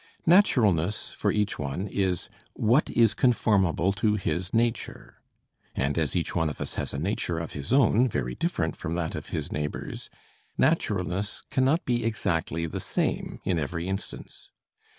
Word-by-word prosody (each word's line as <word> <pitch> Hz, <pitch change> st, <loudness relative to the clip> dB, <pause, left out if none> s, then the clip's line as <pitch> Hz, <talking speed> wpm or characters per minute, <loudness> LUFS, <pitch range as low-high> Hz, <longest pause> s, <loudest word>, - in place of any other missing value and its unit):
Naturalness 105 Hz, -, +3 dB
for -, -, 0 dB
each 105 Hz, -1 st, 0 dB
one 75 Hz, +7 st, -3 dB
is 95 Hz, -3 st, -1 dB, 0.3 s
what 120 Hz, +8 st, +2 dB
is 115 Hz, -4 st, +4 dB
conformable 100 Hz, -7 st, +2 dB
to 105 Hz, +1 st, +1 dB
his 90 Hz, -1 st, -2 dB
nature; 115 Hz, 0 st, -2 dB, 0.5 s
and 70 Hz, +2 st, 0 dB
as 80 Hz, -2 st, 0 dB
each 85 Hz, -, -1 dB
one 80 Hz, -2 st, +2 dB
of 75 Hz, -, -7 dB
us -, -, -3 dB
has -, -, -3 dB
a -, -, -4 dB
nature 85 Hz, +1 st, -1 dB
of 85 Hz, 0 st, -4 dB
his 70 Hz, +5 st, -6 dB
own 130 Hz, -2 st, +5 dB
very 60 Hz, -, -2 dB
different -, -, -1 dB
from 80 Hz, -, -4 dB
that 85 Hz, -2 st, -2 dB
of -, -, -6 dB
his -, -, -3 dB
neighbors, 75 Hz, 0 st, -4 dB, 0.5 s
naturalness 100 Hz, 0 st, 0 dB
cannot 135 Hz, +6 st, +2 dB
be 120 Hz, -1 st, 0 dB
exactly 85 Hz, -7 st, -1 dB
the 80 Hz, -, -4 dB
same -, -, -2 dB
in 90 Hz, -3 st, 0 dB
every 85 Hz, +4 st, -3 dB
instance. 95 Hz, 0 st, -6 dB
95 Hz, 155 wpm, -27 LUFS, 80-110 Hz, 0.5 s, own